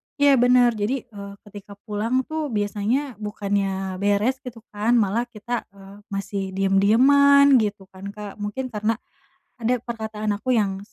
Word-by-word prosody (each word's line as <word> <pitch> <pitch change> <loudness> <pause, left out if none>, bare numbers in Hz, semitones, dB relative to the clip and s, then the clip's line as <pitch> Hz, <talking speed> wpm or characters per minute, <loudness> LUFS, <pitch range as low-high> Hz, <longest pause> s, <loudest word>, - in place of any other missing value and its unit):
Iya 285 -3 +4
bener, 245 -1 +5
jadi, 225 +4 -2
eee, 200 -4 -10
ketika 205 -1 -12
pulang 225 +5 -1
tuh 315 +1 -3
biasanya 215 +3 -2
bukannya 195 -2 -2
beres 205 +6 +1
gitu 240 -4 -10
kan, 215 +4 +1
malah 230 +2 +1
kita, 240 +1 -5
eee, 195 +1 -15
masih 195 -2 -4
diem-dieman 260 +8 +5
gitu 205 -2 -2
kan 190 +1 -9
Kak, 210 0 -9
mungkin 245 +5 -4
karena 215 +1 -1 0.6
ada 240 +2 +1
perkataan 220 -2 -4
aku 255 +2 0
yang 195 -3 0
215 Hz, 145 wpm, -23 LUFS, 200-245 Hz, 0.6 s, bener